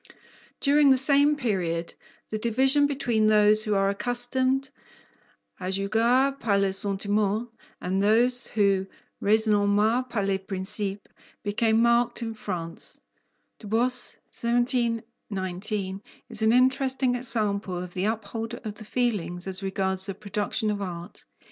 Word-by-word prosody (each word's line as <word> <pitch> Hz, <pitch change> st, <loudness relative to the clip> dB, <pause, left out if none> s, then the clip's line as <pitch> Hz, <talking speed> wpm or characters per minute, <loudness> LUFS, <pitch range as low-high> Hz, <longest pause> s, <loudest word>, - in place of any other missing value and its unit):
During 285 Hz, 0 st, +4 dB
the 265 Hz, -, +5 dB
same 285 Hz, +2 st, +5 dB
period, 180 Hz, -, -2 dB, 0.4 s
the 215 Hz, -, -3 dB
division 265 Hz, +6 st, +4 dB
between 245 Hz, -6 st, 0 dB
those 215 Hz, 0 st, +4 dB
who 210 Hz, -2 st, 0 dB
are 195 Hz, 0 st, +2 dB
accustomed 255 Hz, +5 st, 0 dB, 0.9 s
"à 185 Hz, -, -5 dB
juger 235 Hz, +8 st, +1 dB
par 210 Hz, -3 st, +1 dB
le 195 Hz, -1 st, +1 dB
sentiment" 205 Hz, +3 st, -1 dB, 0.3 s
and 190 Hz, +2 st, -1 dB
those 240 Hz, +4 st, +2 dB
who 195 Hz, -3 st, +1 dB, 0.3 s
"raisonnent 215 Hz, +3 st, +2 dB
par 210 Hz, -4 st, -1 dB
les 195 Hz, -1 st, 0 dB
principes" 195 Hz, +1 st, -3 dB, 0.4 s
became 220 Hz, +2 st, +2 dB
marked 235 Hz, 0 st, +2 dB
in 225 Hz, -1 st, -4 dB
France, 175 Hz, -6 st, -5 dB, 0.6 s
Du 215 Hz, -, -10 dB
Bos 245 Hz, +4 st, +1 dB
(1719) 225 Hz, -5 st, -2 dB, 0.3 s
is -, -, -6 dB
an 220 Hz, 0 st, +4 dB
interesting 260 Hz, +1 st, +2 dB
example 215 Hz, -6 st, -2 dB
of 180 Hz, 0 st, -6 dB
the 185 Hz, +1 st, -2 dB
upholder 225 Hz, +1 st, -3 dB
of 215 Hz, -, -4 dB
the 215 Hz, +1 st, -11 dB
feelings 200 Hz, -8 st, -2 dB
as 190 Hz, 0 st, 0 dB
regards 190 Hz, 0 st, 0 dB
the 195 Hz, -, -4 dB
production 210 Hz, +1 st, -2 dB
of 205 Hz, -1 st, -4 dB
art. 175 Hz, -2 st, -7 dB
215 Hz, 130 wpm, -26 LUFS, 195-245 Hz, 0.9 s, the